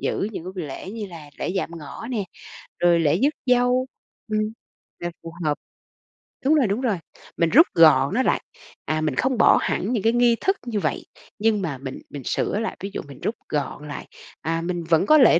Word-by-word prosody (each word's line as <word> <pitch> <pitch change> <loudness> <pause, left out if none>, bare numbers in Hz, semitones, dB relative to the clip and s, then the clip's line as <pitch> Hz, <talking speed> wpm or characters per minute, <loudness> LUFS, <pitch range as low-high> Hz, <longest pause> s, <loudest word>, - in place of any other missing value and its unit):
giữ 200 - -1
những 170 - -6
cái 185 - -6
buổi 175 - -3
lễ 145 +7 -7
như 215 -2 -5
là 160 -5 -11
lễ - - -2
dạm 185 - -1
ngõ 150 +9 -8
nè, 215 -5 -1 0.6
rồi 175 -1 +5
lễ 160 +1 +3
rước 290 +2 +3
dâu. 250 +1 +3 0.5
Ừm. 215 - +2 0.6
Là 175 0 -3
phù 165 - -8
hợp! 150 - +2 0.9
Đúng 310 +3 +5
rồi, 265 -8 +4
đúng 205 +6 -1
rồi, 225 -7 +1 0.4
mình 170 -1 +3
rút 320 - +7
gọn 155 -1 +6
nó 260 +3 +2
lại. - - +2 0.4
À, 155 0 0
mình 155 - 0
không 260 -2 +1
bỏ - - +6
hẳn 215 +6 -1
những 215 -5 0
cái 225 +1 +4
nghi 240 -1 +4
thức 385 +1 +2
như 220 -3 -1
vậy, - - -2 0.3
nhưng 215 -1 +2
mà 155 -7 -2
mình 130 0 -7
mình 140 -3 -7
sửa 205 - 0
lại, 225 - -3
ví 195 - -4
dụ - - -3
mình 140 -2 -11
rút 225 - -1
gọn 150 0 -3
lại, 145 - -7 0.3
à, 165 +1 -1
mình 175 0 -2
vẫn 165 +3 +3
có 310 - +7
lễ 230 - +7
190 Hz, 220 wpm, -24 LUFS, 160-235 Hz, 0.9 s, rút